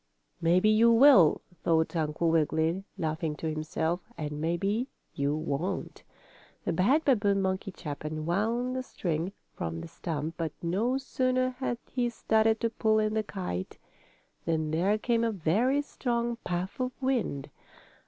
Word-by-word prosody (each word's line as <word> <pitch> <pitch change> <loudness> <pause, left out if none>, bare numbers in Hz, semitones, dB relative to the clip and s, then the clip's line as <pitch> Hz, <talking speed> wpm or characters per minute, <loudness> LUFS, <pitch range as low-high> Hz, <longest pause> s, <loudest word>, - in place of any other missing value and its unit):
"Maybe 175 +4 +4
you 225 +2 +6
will," 230 - +7 0.2
thought 160 0 +2
Uncle 160 +1 +1
Wiggily, 160 +3 +1
laughing 160 -1 -2
to 160 +1 -3
himself. 160 +2 -1 0.2
"And 150 -1 -4
maybe 195 +9 0 0.3
you 140 +1 0
won't." 155 +4 -3 0.6
The - - 0
bad 255 - +3
babboon 205 -7 +3
monkey 190 +1 -1
chap 150 -6 -7
unwound 200 +12 -1
the 260 - -1
string 175 -7 -3 0.2
from 80 0 -4
the 85 - -7
stump, 155 - -4
but 160 -3 -2
no 215 +10 +1
sooner 255 -1 0
had 250 -1 -3
he 245 -2 0
started 220 -1 +2
to 230 -1 +1
pull 220 -1 +2
in 215 0 +1
the 220 - +2
kite 180 - -5 0.7
than 160 -2 0
there 185 +7 +2
came 230 +1 +1
a 230 - +2
very 220 - +1
strong 240 -4 -2
puff 180 +4 -3
of 255 0 -3
wind. 235 - -1
190 Hz, 145 wpm, -29 LUFS, 160-235 Hz, 0.7 s, will